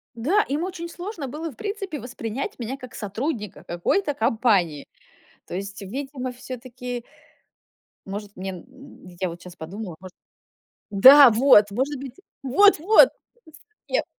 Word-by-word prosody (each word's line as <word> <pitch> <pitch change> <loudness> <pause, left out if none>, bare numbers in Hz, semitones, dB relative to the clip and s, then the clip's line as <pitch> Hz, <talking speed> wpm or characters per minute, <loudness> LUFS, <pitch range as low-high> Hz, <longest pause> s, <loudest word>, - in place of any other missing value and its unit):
Да, 335 - +2
им 290 +4 -1
очень 355 -2 -5
сложно 350 -4 -6
было, 310 +5 -5
в 240 - -17
принципе, 395 -7 -5
воспринять 245 +1 -5
меня 245 +4 -4
как 255 -3 -12
сотрудника 215 - -4
какой-то 285 - -1
компании. 215 - +1 0.6
То - - -8
есть, 200 +1 -6
видимо, 260 +4 -5
всё-таки 250 -1 -7 1.0
Может, 205 +1 -6
мне 190 +1 -5
н 260 +5 -13
я 185 - 0
вот 170 +1 -9
щас 180 -1 -12
подумала, 180 +1 -7
может 185 -1 -12 0.8
Да, 260 +7 +9
вот! 215 -3 +5
Может 265 +5 -2
быть 265 -2 -8 0.3
Вот-вот! 400 - +6 0.8
Совет. - - 0
250 Hz, 130 wpm, -24 LUFS, 205-290 Hz, 1.0 s, Да